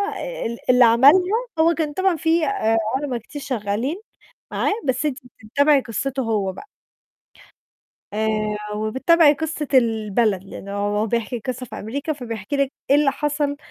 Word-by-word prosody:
آآ، - - -6
آآ - - -4
ال 235 +1 -3
اللي 250 0 +6
عملها، 350 - +5 0.2
هو 330 +1 +5
كان 305 -2 -2
طبعًا 375 0 +1
فيه 320 +1 +1
آآ، 225 - +1 0.2
عُلَما 265 -3 -2
كتير 285 +6 -9
شغالين 255 - -2 0.5
معاه، - - 0
بس 260 +2 0
أنتِ 275 -2 -1 0.2
بتتابعي 285 +5 +3
قصتُه 265 +3 -3
هو 205 -5 -1
بقى. 420 - -11 1.5
آآ، 220 +1 0 0.5
وبتتابعي 270 +9 +4
قصة 310 -1 -4
البلد، 220 -4 +2
لأنه 200 0 -9
هو 205 +2 -1
بيحكي 235 +2 -2
القصّة 255 +2 -5
في - - -8
أمريكا، 280 +9 -3
فبيحكي 230 -2 -5
لِك 275 -1 0 0.2
إيه 280 - +7
اللي 295 -2 +3
حصل، 290 0 -1
260 Hz, 155 wpm, -22 LUFS, 225-295 Hz, 1.5 s, إيه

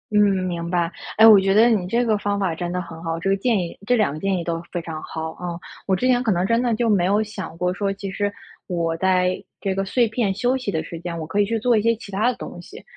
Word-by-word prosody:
嗯， 210 - +5 0.2
明 170 -2 -3
白。 175 -1 0 0.2
哎， 220 - +7
我 215 -3 +9
觉 195 0 +2
得 225 +4 +6
你 205 -6 +1
这 235 +6 +1
个 220 -2 +2
方 205 0 -1
法 190 -4 0
真 175 +2 -4
的 180 0 -2
很 165 -2 -10
好， 165 -1 -3
这 180 +4 -2
个 195 - +2
建 225 +2 +1
议 175 -3 -4
这 245 - +4
2 215 -10 +2
个 155 - -6
建 195 +1 0
议 175 - -3
都 165 -1 -2
非 175 - -3
常 160 -2 -6
好 160 0 -5
啊。 175 0 -6 0.3
我 190 - +3
之 215 - -1
前 250 -1 +3
可 235 -4 +1
能 175 +1 0
真 230 +4 +2
的 240 -2 +1
就 235 0 0
没 195 -5 +3
有 205 +3 +2
想 190 -6 -7
过 180 +1 0
说， 200 0 -1
其 195 0 -6
实 205 +1 -1 0.4
我 170 -3 -1
在 185 0 +1 0.2
这 195 - -1
个 195 +1 -1
碎 235 +3 +2
片 220 -3 0
休 245 +5 +1
息 255 -5 -4
的 160 -5 -1
时 165 - -8
间， 170 0 -5
我 160 - -4
可 165 +6 -2
以 205 - +4
去 225 +3 -1
做 235 +1 +3
一 - - +2
些 230 +2 +2
其 210 -2 -11
它 210 +5 +2
的 250 - -2
东 - - -8
西。 - - -12
195 Hz, 310 characters per minute, -22 LUFS, 175-220 Hz, 0.4 s, 我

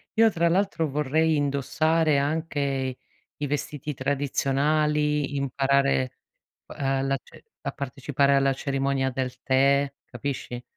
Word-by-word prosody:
io 225 0 +5
tra 170 -1 +2
l'altro 180 -4 +1
vorrei 150 +3 +1
indossare 150 +2 +1
anche 140 -3 -1 0.4
i 145 - -1
vestiti 150 +1 -3
tradizionali, 145 +2 +1
imparare, 140 -1 +1 0.5
uhm, 135 -1 -1
la 135 0 +1
ce - - -17 0.2
a - - -3
partecipare 140 0 0
alla 135 0 +3
cerimonia 135 -1 -1
del 130 0 -4
tè, 140 +1 +3
capisci. 125 -1 -5
140 Hz, 110 wpm, -26 LUFS, 135-150 Hz, 0.5 s, io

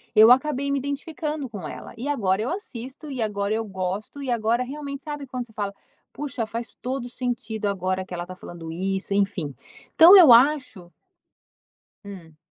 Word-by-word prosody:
eu 220 +3 +8
acabei 280 +1 +2
me 280 - +1
identificando 295 +1 -4
com 200 -7 -7
ela. - - -9
E 255 +5 -4
agora 200 -8 +1
eu 235 - -2
assisto, 275 - -7
e 260 -4 -4
agora 205 -1 -1
eu 225 - -1
gosto, 195 +6 -4
e 270 - -4
agora 235 0 +1
realmente 280 +1 -7
sabe 295 -2 -5
quando 255 -1 -5
você 225 - -17
fala: 205 -2 -3 0.4
"Puxa, 270 -5 -4
faz 230 +1 -6
todo 255 0 -3
o - - -7
sentido 235 -4 -3
agora 185 -1 -1
que 185 - -10
ela 175 0 -4
tá 185 - -9
falando 170 -2 -9
isso", 195 +3 -1
enfim, 195 -9 -1 0.4
então 350 +5 +10
eu 320 -10 +9
acho 245 -8 +3 1.1
Hum. 175 -6 -11
230 Hz, 180 wpm, -24 LUFS, 195-275 Hz, 1.1 s, então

